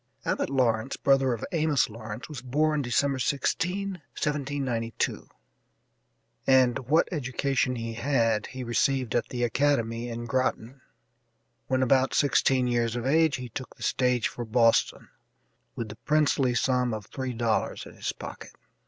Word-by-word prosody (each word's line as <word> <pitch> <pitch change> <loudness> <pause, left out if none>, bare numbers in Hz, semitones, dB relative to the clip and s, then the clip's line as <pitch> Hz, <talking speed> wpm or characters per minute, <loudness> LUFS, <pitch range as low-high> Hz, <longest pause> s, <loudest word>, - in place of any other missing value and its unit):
Abbott - - 0
Lawrence, 125 -3 +1
brother 135 -1 +3
of 115 - -3
Amos 155 -5 +2
Lawrence, 110 +1 -8
was 150 -5 -7
born 150 +4 +1
December 135 +2 +1
16, 180 +8 -1 0.2
1792, 135 -6 -2 1.2
and 130 -1 +4
what 160 +3 +4
education 135 -3 0
he 115 -1 -4
had 115 -3 +1
he 130 0 -7
received 125 0 0
at 120 - 0
the 120 -1 -2
academy 120 -2 +1
in 120 0 -5
Groton. 130 +1 -2 0.9
When 130 0 +1
about 130 +1 +3
sixteen 135 -2 +3
years 120 -1 0
of 120 0 -3
age 160 +2 +3
he 125 -2 -6
took 130 +3 -7
the - - -10
stage 125 -3 +1
for 120 - -6
Boston, 115 0 +2 0.7
with 115 -2 -4
the 105 - -9
princely 145 -4 +2
sum 125 -2 +1
of 105 -2 -7
three 130 +2 -5
dollars 115 -4 -1
in - - -12
his - - -3
pocket. - - -10
130 Hz, 145 wpm, -27 LUFS, 115-140 Hz, 1.2 s, and